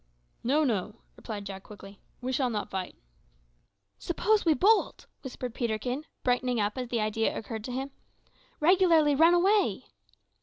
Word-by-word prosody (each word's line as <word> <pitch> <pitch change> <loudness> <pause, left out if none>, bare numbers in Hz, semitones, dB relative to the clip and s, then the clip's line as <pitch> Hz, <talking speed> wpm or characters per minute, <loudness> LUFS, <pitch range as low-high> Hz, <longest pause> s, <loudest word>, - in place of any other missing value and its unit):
"No, 285 +6 +2
no," 215 -5 -1 0.2
replied 210 -3 -7
Jack 195 -1 -7
quickly; 200 0 -13 0.2
"we 255 +1 -3
shall 260 -1 +1
not 210 -3 -4
fight." 190 -1 -4 1.0
"Suppose 420 +4 +1
we 320 -2 +4
bolt!" 425 - +2 0.2
whispered 250 -2 -6
Peterkin, 245 +4 -2 0.2
brightening 250 -1 +1
up 205 0 0
as 255 -1 -4
the 235 -1 -1
idea 215 +1 0
occurred 220 0 -6
to 255 - -5
him 265 +2 -4 0.7
"regularly 330 -3 +4
run 325 +5 +5
away!" 390 +4 +2
250 Hz, 145 wpm, -28 LUFS, 215-310 Hz, 1.0 s, run